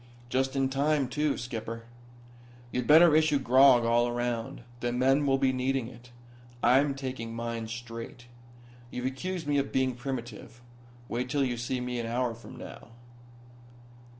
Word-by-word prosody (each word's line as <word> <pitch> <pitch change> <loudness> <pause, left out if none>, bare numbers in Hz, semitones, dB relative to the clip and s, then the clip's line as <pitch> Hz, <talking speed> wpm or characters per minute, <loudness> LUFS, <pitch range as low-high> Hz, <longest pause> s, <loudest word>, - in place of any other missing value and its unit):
"Just 130 +1 0
in 135 -1 +2
time, 140 +1 +1
too. 150 +3 0
Skipper, 115 -1 -6 0.9
you'd 125 -1 -2
better 160 +1 +7
issue 155 -2 +4
grog 130 -1 +5
all 120 +1 +3
around. 120 -1 -3 0.2
The 120 0 -1
men 135 +4 +2
will 135 0 +3
be 135 -1 +2
needing 130 -1 -1
it. 125 0 -15 0.5
I'm 135 +3 +4
taking 130 -4 -5
mine 115 -1 -4
straight. 115 +1 -8 0.6
You've 125 0 -5
accused 165 +6 -3
me 145 -1 +1
of 140 - -2
being 130 -1 +1
primitive. 120 -2 -6 0.5
Wait 125 +2 -3
till 145 0 +1
you 125 -2 -1
see 120 +2 -3
me 125 -1 -3
an 115 - -3
hour 120 0 -1
from 115 +3 -12
now." 125 - -10
125 Hz, 150 wpm, -29 LUFS, 120-135 Hz, 0.9 s, better